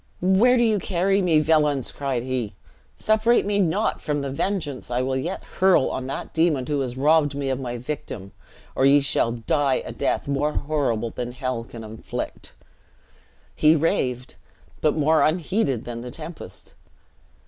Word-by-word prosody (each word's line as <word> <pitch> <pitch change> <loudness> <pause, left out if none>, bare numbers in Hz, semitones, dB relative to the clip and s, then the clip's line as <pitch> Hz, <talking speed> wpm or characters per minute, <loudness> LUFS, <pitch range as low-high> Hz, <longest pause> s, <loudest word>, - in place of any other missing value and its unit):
"Where 195 +8 +4
do 240 - +4
you 220 -3 +2
carry 195 +2 +1
me, 165 -4 +3
villians?" 150 -4 +2
cried 135 -4 -2
he. 125 -5 -3 0.4
"Separate 220 +2 +3
me 205 0 0
not 170 -5 +1
from 145 -1 -1
the 140 -1 -3
vengeance 145 -4 -2
I 125 +1 0
will 130 0 -1
yet 170 +9 -3
hurl 185 -7 +2
on 130 - -4
that 135 - -5
demon 160 -6 +2
who 145 +1 -1
has 125 -1 -4
robbed 145 0 +3
me 140 -1 -2
of 130 - -2
my 120 -2 -4
victim, 120 -6 -6 0.4
or - - 0
ye 140 +1 +6
shall 135 -4 +1
die 130 +4 0
a - - -6
death - - -1
more 145 +2 0
horrible 135 -7 -1
than 120 0 -5
hell 125 -2 -3
can 115 -1 -10
inflict!" 110 +1 -6 1.0
He 155 +1 +5
raved; 125 -5 0 0.5
but 155 - +2
more 155 +1 +3
unheeded 155 - +1
than 115 -1 -6
the 125 - -7
tempest. 155 - -9
145 Hz, 165 wpm, -24 LUFS, 125-165 Hz, 1.0 s, ye